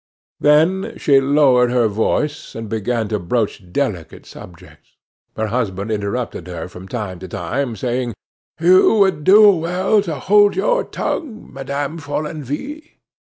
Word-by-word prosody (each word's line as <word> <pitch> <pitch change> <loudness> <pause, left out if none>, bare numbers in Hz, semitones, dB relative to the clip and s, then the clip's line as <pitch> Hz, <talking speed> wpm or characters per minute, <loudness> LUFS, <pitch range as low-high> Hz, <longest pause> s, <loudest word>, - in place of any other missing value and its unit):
Then 160 +6 +2
she 140 -2 +4
lowered 135 -3 +3
her 120 -2 +2
voice, 115 +8 -2
and 115 -1 -6
began 110 +1 -2
to 105 -2 -1
broach 100 -1 -3
delicate 95 - -3
subjects. 85 -2 -15 0.4
Her 110 - -1
husband 105 -3 -2
interrupted 105 -3 -3
her 85 -2 -6
from 90 +1 -12
time 100 -6 -5
to 95 - -8
time, 115 +9 -3
saying: 120 +1 -3 0.4
"You 185 +6 +5
would 190 -7 +2
do 205 +4 +7
well 185 +4 +1
to 170 -6 -4
hold 205 +8 +3
your - - +1
tongue, 245 -10 -5
Madame 140 +3 -4
Follenvie." 155 - -6
135 Hz, 135 wpm, -19 LUFS, 110-170 Hz, 0.4 s, do